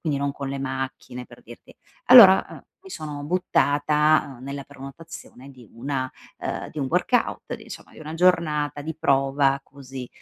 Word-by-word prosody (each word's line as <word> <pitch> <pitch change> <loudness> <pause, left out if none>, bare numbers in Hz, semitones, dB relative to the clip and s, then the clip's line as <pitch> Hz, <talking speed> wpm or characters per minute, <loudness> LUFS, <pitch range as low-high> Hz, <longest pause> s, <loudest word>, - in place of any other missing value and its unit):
quindi 150 -4 -2
non 140 0 -2
con 140 -1 -6
le 140 - -4
macchine 130 -2 -5
per - - -16
dirti. - - -15 0.3
Allora, 210 -7 +9
ehm, - - -12 0.2
mi 385 0 -15
sono 150 - -7
buttata, 150 -4 +1
ehm, 130 - -12
nella 140 0 -6
prenotazione 135 -1 -12
di 125 -3 -16
una, 130 +2 -4 0.3
ehm, - - -5
di 155 - -8
un 135 - -1
workout, - - 0
insomma, - - -12
di - - -16
una 155 0 -8
giornata 155 -5 +1
di 160 +2 -5
prova 135 -1 +2
così. 135 -3 -10
140 Hz, 165 wpm, -23 LUFS, 135-155 Hz, 0.3 s, Allora